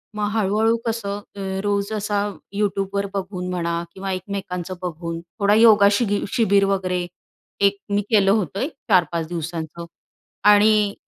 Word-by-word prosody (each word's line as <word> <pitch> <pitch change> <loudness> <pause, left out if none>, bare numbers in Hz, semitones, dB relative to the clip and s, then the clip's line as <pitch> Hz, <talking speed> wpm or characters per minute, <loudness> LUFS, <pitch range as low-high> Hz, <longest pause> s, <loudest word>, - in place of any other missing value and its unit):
मग 210 -1 -1
हळूहळू 220 +3 +2
कसं 205 -3 -3 0.4
रोज 200 +1 0
असा 205 -1 -1 0.4
YouTube 200 -1 -1
बघून 185 -2 -4
म्हणा 170 -1 -2
किंवा 195 0 -5
एकमेकांचं 185 -1 -4
बघून 170 -1 -4
थोडा 200 +4 0
योगा 215 -3 +7
शिगी 205 -1 +1
शिबीर 200 -3 +3
वगैरे 185 -2 -1 0.6
एक 200 0 +3 0.2
मी 205 - +2
केलं 200 -3 +4
होतं 200 -2 0
एक 285 +5 -2 0.2
4-5 165 -2 +2
दिवसांचं. 170 0 -5 0.6
आणि 210 0 +5
200 Hz, 130 wpm, -22 LUFS, 180-205 Hz, 0.6 s, योगा